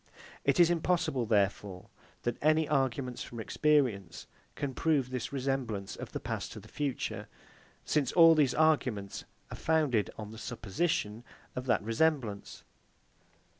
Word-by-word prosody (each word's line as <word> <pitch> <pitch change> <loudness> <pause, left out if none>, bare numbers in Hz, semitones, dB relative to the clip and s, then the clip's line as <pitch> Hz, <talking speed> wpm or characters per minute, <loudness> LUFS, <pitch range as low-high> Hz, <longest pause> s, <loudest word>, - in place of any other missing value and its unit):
It - - +2
is 175 -1 +6
impossible, 165 -7 0
therefore, 100 -3 0 0.4
that 120 -1 -2
any 155 +1 +3
arguments 130 -3 -1
from 120 - -7
experience 120 - +1 0.3
can 140 -2 -3
prove 140 -4 +1
this 125 -3 -3
resemblance 130 -8 -2
of - - -8
the - - -4
past - - -4
to - - -8
the - - -14
future; 145 -3 -3 0.6
since 140 -4 +1
all 165 -2 +8
these 145 -5 +3
arguments 125 -11 +1 0.3
are - - -6
founded 150 -10 +1
on 105 -1 -7
the 110 - -9
supposition 115 - -2 0.3
of 125 +1 -5
that 115 -5 +2
resemblance. 115 -3 -1
130 Hz, 135 wpm, -31 LUFS, 110-155 Hz, 0.6 s, all